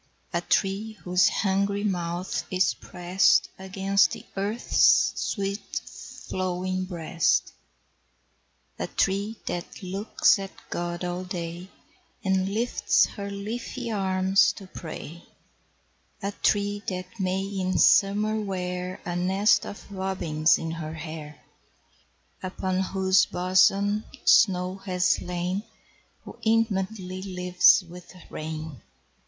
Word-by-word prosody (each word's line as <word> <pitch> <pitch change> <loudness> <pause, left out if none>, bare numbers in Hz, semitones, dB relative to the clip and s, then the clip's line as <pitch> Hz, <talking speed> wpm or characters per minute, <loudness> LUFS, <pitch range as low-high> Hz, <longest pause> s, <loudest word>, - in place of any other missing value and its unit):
A 170 - +1
tree 200 +4 0
whose 180 0 +4
hungry 200 +1 0
mouth 175 -2 -2
is 185 0 +2
prest 180 +2 +2
Against 195 +1 +2
the - - -8
earth's 205 +4 +3
sweet 200 0 -3 0.5
flowing 185 0 -2
breast; 165 -3 0 1.3
A - - -2
tree 200 +3 0
that 175 +2 -5
looks 195 +2 +2
at 195 0 -5 0.2
God 175 0 -3
all 180 +1 -3
day, 175 0 -6 0.5
And 190 0 +1
lifts 230 +4 +2
her 200 -1 -6
leafy 230 +4 -5
arms 190 -2 +3
to 195 - -11
pray; 170 -2 -8 1.0
A 200 - -1
tree 205 0 0
that 185 +3 -5
may 190 0 0
in 190 -2 -2
Summer 210 +2 +4
wear 180 -2 -4
A 175 - -3
nest 190 +4 +2
of 205 - -10
robins 180 -5 +1
in 165 - -4
her 160 -1 -5
hair; 155 -2 -8 1.0
Upon 185 0 -2
whose 190 0 +3
bosom 195 +3 +2 0.2
snow 185 -2 +4
has 185 -2 +1
lain; 180 +2 -2 0.6
Who - - -12
intimately 200 -4 0
lives 180 0 +4
with 180 +1 -12 0.2
rain. 155 -4 -6
185 Hz, 110 wpm, -26 LUFS, 180-200 Hz, 1.3 s, whose